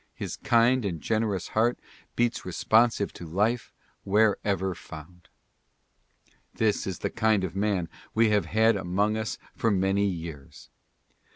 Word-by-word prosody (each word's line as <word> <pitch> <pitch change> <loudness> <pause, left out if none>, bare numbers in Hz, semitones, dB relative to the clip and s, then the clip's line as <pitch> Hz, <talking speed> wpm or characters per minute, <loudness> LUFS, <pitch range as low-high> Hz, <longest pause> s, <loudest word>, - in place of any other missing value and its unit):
His - - -5
kind 125 0 +3
and 90 -5 -3
generous 110 -1 -1
heart 115 +3 +1 0.4
beats 120 0 0
responsive 110 +4 +2
to 85 - -9
life 105 +8 0 0.3
wherever 100 -2 +1
found. 80 +2 -12 1.3
This 110 -3 0
is 95 -3 -3
the - - -1
kind 110 -3 +2
of 95 -1 -4
man 100 -4 0 0.3
we 110 -1 +4
have 105 -1 +2
had 110 +1 +3
among 100 +3 0
us 110 -2 -3 0.2
for 115 - +1
many 100 0 +2
years. 80 -7 -7
100 Hz, 130 wpm, -27 LUFS, 90-110 Hz, 1.3 s, we